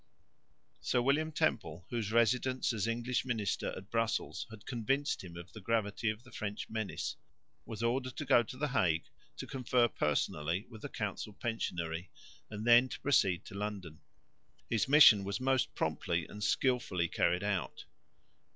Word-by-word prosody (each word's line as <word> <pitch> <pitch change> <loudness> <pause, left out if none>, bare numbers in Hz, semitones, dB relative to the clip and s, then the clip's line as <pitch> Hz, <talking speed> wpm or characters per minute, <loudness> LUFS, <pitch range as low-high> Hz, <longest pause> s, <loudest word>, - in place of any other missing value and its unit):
Sir 125 - +1
William 145 +5 +2
Temple, 110 - -1
whose 115 -4 -2
residence 125 +3 +2
as 110 -1 -1
English 120 +2 -1
minister 110 -6 -1
at 95 +2 -11
Brussels 110 -7 -1
had 110 -2 -12
convinced 135 +3 -1
him 85 -2 -9
of 85 0 -10
the 110 - -9
gravity 110 0 0
of 110 +2 -4
the 130 - -16
French 105 -1 -4
menace, 110 -2 -3 0.5
was 115 0 -5
ordered 130 +2 0
to 150 - -3
go 130 -3 +6
to 130 +3 -8
the 150 +2 -1
Hague 90 -11 +2 0.3
to - - -5
confer 125 -2 +2
personally 75 +2 -1
with 110 -2 -11
the - - -6
council 105 - -4
pensionary 85 -7 -3 0.4
and 105 0 -6
then 120 +2 +6
to - - -6
proceed 95 -11 +2
to - - -10
London. 100 -6 -5 0.7
His 115 +1 +2
mission 135 -8 +8
was 100 0 -3
most 130 0 +1
promptly 85 -2 -1
and 105 0 -8
skilfully 100 -7 +1
carried 90 +2 +1
out. 100 -3 -2
110 Hz, 160 wpm, -33 LUFS, 95-125 Hz, 0.7 s, mission